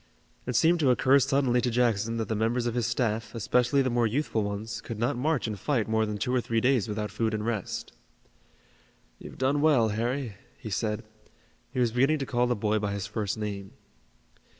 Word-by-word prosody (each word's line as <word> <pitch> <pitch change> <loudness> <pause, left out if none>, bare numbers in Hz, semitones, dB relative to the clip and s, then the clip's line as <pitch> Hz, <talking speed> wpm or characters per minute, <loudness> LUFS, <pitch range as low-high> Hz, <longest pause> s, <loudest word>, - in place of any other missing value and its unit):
It 125 - -2
seemed 170 +1 +4
to 145 -4 +3
occur 130 +2 +5
suddenly 135 -2 +2
to 125 - 0
Jackson 115 -2 +1
that 115 - -2
the 110 - -1
members 115 +3 0
of 120 - -1
his 120 -4 0
staff, 110 -2 -1
especially 125 +5 +2
the 130 - 0
more 120 -1 +2
youthful 120 -1 -1
ones, 105 +1 -4
could 115 - -6
not 120 +6 0
march 145 +3 0
and 105 -3 -4
fight 130 -8 0
more 110 0 +1
than 105 0 -3
two 125 +4 -1
or 125 - +2
three 115 -1 0
days 125 -3 +2
without 105 0 -3
food 110 -1 -1
and 105 0 -3
rest. 110 - -3 1.3
"You've - - -10
done 135 +2 +1
well, 140 -8 +4
Harry," 115 +1 -2 0.2
he 110 -5 -8
said 105 +2 -1 0.7
he 130 - -3
was 120 -2 +2
beginning 135 +6 +3
to 135 - -3
call 125 -1 +1
the 125 - +1
boy 105 0 0
by 100 -1 -2
his 100 0 -3
first 105 0 -3
name. 100 -2 -5
115 Hz, 205 wpm, -28 LUFS, 110-130 Hz, 1.3 s, occur